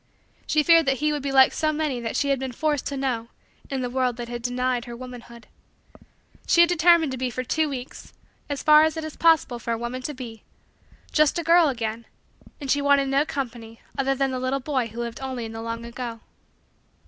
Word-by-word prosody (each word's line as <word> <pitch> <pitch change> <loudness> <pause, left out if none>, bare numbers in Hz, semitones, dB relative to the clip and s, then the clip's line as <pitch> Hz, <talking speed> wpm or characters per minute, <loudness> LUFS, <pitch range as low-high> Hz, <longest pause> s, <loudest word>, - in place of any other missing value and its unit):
She 305 -1 +2
feared 330 -1 +5
that 270 - +3
he 300 +2 0
would 295 - -2
be 275 0 -3
like 265 -1 +6
so 310 -1 +1
many 300 -4 -2
that 230 -1 -4
she 285 - +1
had 275 -2 +1
been 265 -1 -4
forced 300 +1 -1
to 280 - -4
know 250 -4 -2 0.4
in 270 -2 -2
the - - -1
world 250 -2 0
that 240 0 -5
denied 250 0 -1
her 240 - -8
womanhood. 240 -1 -11 1.0
She 340 - +5
had 340 - +6
determined 340 -3 +4
to 260 - -5
be 255 -1 -1
for 255 +1 -4
two 310 +4 0
weeks, 260 -2 -8 0.4
as 285 -1 -3
far 305 0 +7
as 315 0 0
it 320 - -3
is 310 -1 -7
possible 320 -7 +3
for 235 0 -3
a - - -2
woman 240 +2 -5
to 295 +3 -5
be, 230 -4 -9 0.7
just 305 0 +3
a 340 - -2
girl 335 -1 +5
again 230 -2 -4 0.5
and 275 -3 -3
she 285 - +2
wanted 280 -1 +3
no 280 +3 +2
company 230 -4 -5 0.2
other 270 0 0
than 270 0 0
the 255 - -3
little 255 +2 -1
boy 260 -3 -1
who 230 +1 -9
lived 235 -1 -5
only 260 -3 -4
in 225 - -7
the 225 0 -7
long 230 0 -5
ago. 235 -1 -6
260 Hz, 220 wpm, -24 LUFS, 240-295 Hz, 1.0 s, far